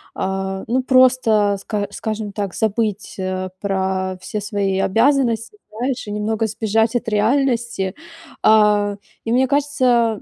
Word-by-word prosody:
А, 190 0 -3
ну 255 +3 +1
просто 245 -6 +4
ска 205 0 -3
скажем 215 -2 -4
так, 200 -2 -4
забыть, 215 -1 -1
э, 185 0 -3
про 190 -1 -1
все 210 - -4
свои 200 -2 -1
обязанности, 235 - +1
знаешь, 240 +2 -3
и - - -5
немного 215 +1 -1
сбежать 220 +2 0
от 225 - -1
реальности. 230 -3 0 0.5
А, 210 -1 +4 0.3
и 225 - -2
мне 260 +1 +3
кажется, 255 -6 +1
215 Hz, 130 wpm, -20 LUFS, 200-235 Hz, 0.5 s, просто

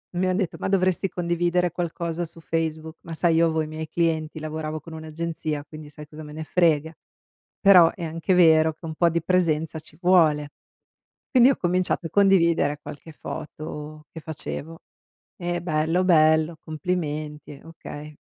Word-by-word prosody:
Mi 185 +1 +1
han 185 0 +1
detto: 190 -5 -2
"Ma - - -2
dovresti 185 0 +1
condividere 175 0 0
qualcosa 170 0 -3
su 165 0 -12
Facebook". 160 0 -3
Ma 165 - -8
sai 165 0 +2
io 165 +1 +4
avevo 160 -1 +1
i 155 - -3
miei 155 +1 -6
clienti 160 -1 -1
lavoravo 155 0 -4
con 160 +2 -12
un'agenzia, 160 -1 -4
quindi 155 -1 -11
sai 150 0 -12
cosa 155 +1 -10
me 150 0 -10
ne 155 +1 -5
frega? 160 -2 +2 0.7
Però 180 -5 +7
è 175 - -6
anche 165 +3 -1
vero 160 -2 +5
che 155 - -21
un 160 - -5
po' 170 +1 +3
di 170 0 -1
presenza 160 -3 +1
ci 155 0 -14
vuole. 160 -5 +4 0.8
Quindi 255 -2 +6
ho 275 - +3
cominciato 180 -1 0
a - - -15
condividere 170 -6 +3
qualche 155 +2 -10
foto 150 0 -8
che 160 - -8
facevo 160 +1 -7 0.6
e: 175 -1 -3
"Bello, 165 +2 +1
bello, 160 -1 +4
complimenti", 150 -3 -4
okay, 150 -2 -10
160 Hz, 165 wpm, -24 LUFS, 155-175 Hz, 0.8 s, Però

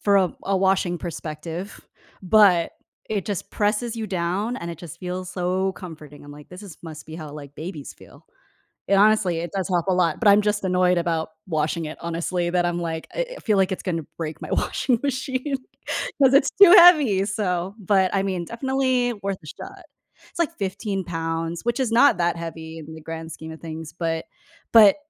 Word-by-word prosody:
for 200 -1 +3
a 185 -3 +3
a 195 - 0
washing 190 -2 +1
perspective, 165 +3 -6 0.4
but 185 -3 +5 0.4
it 205 -3 -2
just 205 -4 -4
presses 220 +3 0
you 220 -1 -3
down 190 +6 -2
and 170 0 -5
it 165 - -7
just 170 -5 -10
feels 180 0 -5
so 185 +1 -1
comforting. 155 -6 -11
I'm, 145 - -10
like, 145 0 -13
this 180 +3 -11
is 185 -7 -11
must 155 -2 -9
be 160 - -9
how 155 -3 -8
like 145 -1 -10
babies 155 -3 -7
feel. - - -18 0.6
And 195 0 +5
honestly, 205 -5 +4
it 170 +1 -4
does 190 0 -2
help 175 0 0
a 190 - +3
lot, 175 -3 +1
but 225 - +2
I'm 205 +1 +7
just 210 0 0
annoyed 180 -1 +3
about 165 -2 -1 0.2
washing 160 0 -1
it, 155 - -7
honestly, 170 +1 -2
that 175 0 +1
I'm, 175 0 -1
like, 160 -1 -4
e - - -2
eh, - - -5
I - - -10
feel 210 -3 +1
like 190 0 +2
it's 190 - -4
gonna 165 -4 -2
break 160 -2 -5
my - - -7
washing 245 -4 0
machine, 265 +1 -2 0.7
'cause 265 -1 +6
it's 275 0 +5
too 385 -3 +11
heavy, 295 - +7
so 195 -2 -2
but 190 -1 +2
I 195 - +1
mean, 185 -3 -2
definitely 255 +1 0
worth 195 -1 -2
a - - -12
shot. 385 - -10 0.5
It's, - - -13
like, 335 -1 +1
15 195 0 -3
pounds, 165 0 -3
which 240 +2 -1
is 250 -4 0
not 240 0 +5
that 170 0 +1
heavy 165 -1 -7
in 160 +1 -10
the 160 - -10
grand 165 +1 -7
scheme 160 0 -8
of 160 - -13
things, 160 -1 -7
but, 165 -1 -2 0.5
but 215 -3 +8
180 Hz, 205 wpm, -23 LUFS, 165-210 Hz, 0.7 s, too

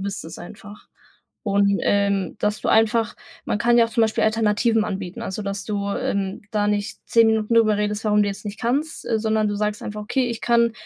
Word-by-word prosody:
bist 200 0 -4
es 160 - -9
einfach. 205 +3 -12 0.6
Und, 200 -1 +2
ähm, 200 -2 +1
dass 210 0 0
du - - -1
einfach 225 +1 +3 0.3
man - - -1
kann 240 +3 +3
ja 235 - +6
auch - - -12
zum 230 +1 0
Beispiel 220 -1 +1
Alternativen 220 +1 +2
anbieten. 190 -3 -5
Also, 190 +3 -4
dass 200 0 -4
du, 200 -2 -2
ähm, 195 -1 -2
da 210 -2 0
nicht 205 +1 -2
10 230 -1 +5
Minuten 220 0 0
drüber 220 -2 +4
redest, 210 +1 -2
warum 210 0 +4
du 205 - 0
jetzt 200 +1 -6
nicht 205 +1 -6
kannst, 280 +7 -1
sondern 220 -1 +1
du 205 - -2
sagst 210 +1 -2
einfach: 210 0 -5
„Okay, 250 +4 0
ich 230 - -5
kann 235 -1 +3
210 Hz, 210 wpm, -22 LUFS, 200-225 Hz, 0.6 s, ja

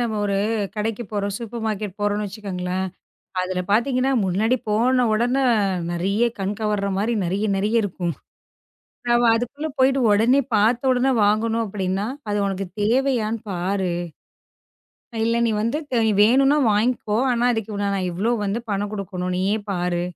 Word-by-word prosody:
நம்ம 230 -2 -1
ஒரு 200 -1 0 0.4
கடைக்குப் 220 +1 -3
போறோம். 200 -1 -2
சூப்பர் 230 0 -6
மார்க்கெட் 210 -3 -3
போறோம்னு 205 0 0
வெச்சுக்கோங்களேன். 190 -2 -4 0.6
அதுல 185 0 -2
பாத்தீங்கன்னா, 255 +4 +2
முன்னாடி 210 +7 +1
போன 250 +4 +3
உடனே 245 +5 +1 0.5
நெறைய 195 +6 0 0.2
கண் 195 +2 -2
கவர 210 -2 0
மாரி 220 +4 0
நெறைய 195 +5 -1
நெறைய 210 +4 0
இருக்கும். 175 -3 -3 1.0
நாம 240 0 +4
அதுக்குள்ள 280 +7 -3
போயிட்டு 265 +1 +3
உடனே 235 +7 +4
பாத்த 230 +4 +3
உடனே 255 +2 +2
"வாங்கணும்" 225 +2 +1
அப்படின்னா 195 0 -2 0.2
அது 205 - 0
உனக்குத் 195 -2 -4
தேவையான்னு 230 -1 +1
பாரு. 185 0 -1 1.3
இல்ல 230 +1 +1
நீ - - +1
வந்து 235 +7 0 0.4
வேணும்னா 270 +6 +4
வாங்கிக்கோ. 215 0 0
ஆனா, 240 0 +1
அதுக்கு 220 -2 -3
நான் 195 -2 -1
இவ்ளோ 200 +7 0
வந்து 205 +4 -1
பணம் 205 0 -1
கொடுக்கணும். 185 -3 -3
நீயே 195 +3 +1
பாரு. 175 -2 -1
210 Hz, 135 wpm, -22 LUFS, 195-235 Hz, 1.3 s, நாம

